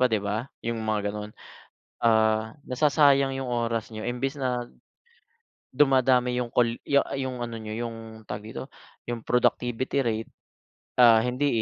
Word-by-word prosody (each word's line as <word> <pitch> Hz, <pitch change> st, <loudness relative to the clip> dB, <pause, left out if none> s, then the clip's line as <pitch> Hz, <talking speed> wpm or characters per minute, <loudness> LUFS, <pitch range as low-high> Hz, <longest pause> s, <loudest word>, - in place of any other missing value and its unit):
pa 125 Hz, -, +5 dB
'di 110 Hz, -3 st, +1 dB
ba? 110 Hz, +6 st, -2 dB, 0.2 s
'Yung 115 Hz, -1 st, -2 dB
mga 105 Hz, -2 st, -1 dB
gano'n. 105 Hz, 0 st, -6 dB, 0.7 s
Ah, 110 Hz, -1 st, +3 dB
nasasayang 140 Hz, 0 st, +3 dB
'yung 135 Hz, -1 st, -4 dB
oras 115 Hz, -2 st, -1 dB
niyo, 110 Hz, +2 st, -5 dB
imbes 135 Hz, +4 st, -2 dB
na 125 Hz, -2 st, -1 dB, 1.1 s
dumadami 130 Hz, -2 st, +3 dB
'yung 120 Hz, -1 st, -3 dB
call 115 Hz, -1 st, +2 dB
ya 140 Hz, 0 st, +4 dB, 0.2 s
'yung 130 Hz, -2 st, -3 dB
ano 115 Hz, -1 st, -4 dB
niyo 110 Hz, -1 st, -6 dB
'yung 115 Hz, -1 st, -10 dB
tawag 105 Hz, 0 st, -5 dB
dito, 135 Hz, -, -7 dB, 0.4 s
'yung 120 Hz, -1 st, -3 dB
productivity 125 Hz, +1 st, +1 dB
rate, 110 Hz, -1 st, -2 dB, 0.7 s
ah, 115 Hz, -2 st, +7 dB
hindi, 125 Hz, +4 st, 0 dB
120 Hz, 145 wpm, -26 LUFS, 110-130 Hz, 1.1 s, ah